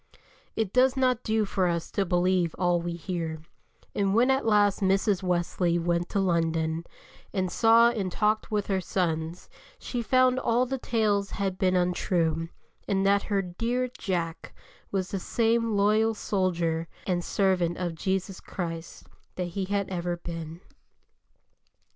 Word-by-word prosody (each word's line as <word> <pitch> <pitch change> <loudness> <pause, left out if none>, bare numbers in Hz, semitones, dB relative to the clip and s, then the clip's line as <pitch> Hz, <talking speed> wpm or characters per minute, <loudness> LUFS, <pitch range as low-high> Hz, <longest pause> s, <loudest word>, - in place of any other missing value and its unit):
It 215 -4 -1
does 260 +1 +4
not 255 -2 +2
do 220 -1 +1
for 190 -2 0
us 170 -1 -2
to 200 - 0
believe 180 -1 +1
all 175 -1 +2
we 170 0 -3
hear, 170 -2 -4 0.5
and 195 0 +1
when 245 +4 +4
at 265 -3 +1
last 205 -2 +4
Mrs. 195 0 +2
Wesley 175 -1 0
went 170 0 0
to 200 - 0
London, 165 -2 0 0.5
and 185 -2 0
saw 230 +3 +5
and 200 -6 -3
talked 215 +3 0
with 210 -2 0
her 190 -2 0
sons, 165 -2 -2 0.3
she 245 - -4
found 255 +2 +3
all 245 0 +2
the 265 +1 -3
tales 210 -5 +1
had 195 -2 -3
been 185 -1 +2
untrue, 170 -2 0 0.4
and 195 -1 +1
that 200 0 +4
her 200 -2 +1
"dear 235 +8 -2
Jack" 170 -4 -3 0.4
was 190 -2 -2
the 195 - -2
same 230 +1 +1
loyal 215 +2 +3
soldier 170 -5 -1 0.2
and 175 -2 0
servant 180 -4 +1
of 175 -2 -2
Jesus 190 +3 -2
Christ 165 -3 -6 0.3
that 180 -1 -3
he 195 0 -2
had 200 0 -1
ever 175 -1 -2
been. 165 -1 -7
190 Hz, 150 wpm, -27 LUFS, 175-215 Hz, 0.5 s, saw